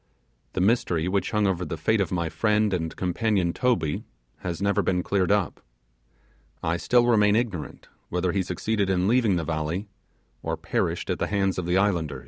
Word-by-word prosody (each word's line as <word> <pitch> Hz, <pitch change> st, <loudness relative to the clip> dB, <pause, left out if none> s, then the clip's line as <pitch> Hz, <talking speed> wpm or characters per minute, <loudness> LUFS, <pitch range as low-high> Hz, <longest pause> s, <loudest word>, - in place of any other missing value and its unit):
The 95 Hz, -, -1 dB
mystery 90 Hz, -5 st, +2 dB
which 100 Hz, +1 st, 0 dB
hung 105 Hz, -1 st, +1 dB
over 95 Hz, -2 st, 0 dB
the 80 Hz, -1 st, -4 dB
fate 105 Hz, +7 st, +2 dB
of 95 Hz, -, -1 dB
my 85 Hz, -2 st, 0 dB
friend 105 Hz, +2 st, +1 dB
and 80 Hz, -3 st, -2 dB
companion 95 Hz, -1 st, 0 dB
Toby 115 Hz, -12 st, 0 dB, 0.3 s
has 85 Hz, -2 st, -4 dB
never 100 Hz, +1 st, +2 dB
been 90 Hz, -1 st, 0 dB
cleared 95 Hz, -2 st, +1 dB
up. 100 Hz, -3 st, 0 dB, 1.0 s
I 80 Hz, +2 st, 0 dB
still 120 Hz, +8 st, +3 dB
remain 105 Hz, -3 st, +4 dB
ignorant 110 Hz, -9 st, -3 dB, 0.2 s
whether 90 Hz, 0 st, 0 dB
he 95 Hz, -, +1 dB
succeeded 100 Hz, +2 st, -1 dB
in 90 Hz, 0 st, +2 dB
leaving 115 Hz, -4 st, +3 dB
the 85 Hz, -, -1 dB
valley, 85 Hz, +6 st, -2 dB, 0.5 s
or -, -, -3 dB
perished -, -, -1 dB
at -, -, -2 dB
the -, -, 0 dB
hands 95 Hz, -2 st, 0 dB
of 90 Hz, -, -4 dB
the 90 Hz, +1 st, +2 dB
islanders. 85 Hz, -9 st, 0 dB
95 Hz, 180 wpm, -25 LUFS, 85-105 Hz, 1.0 s, remain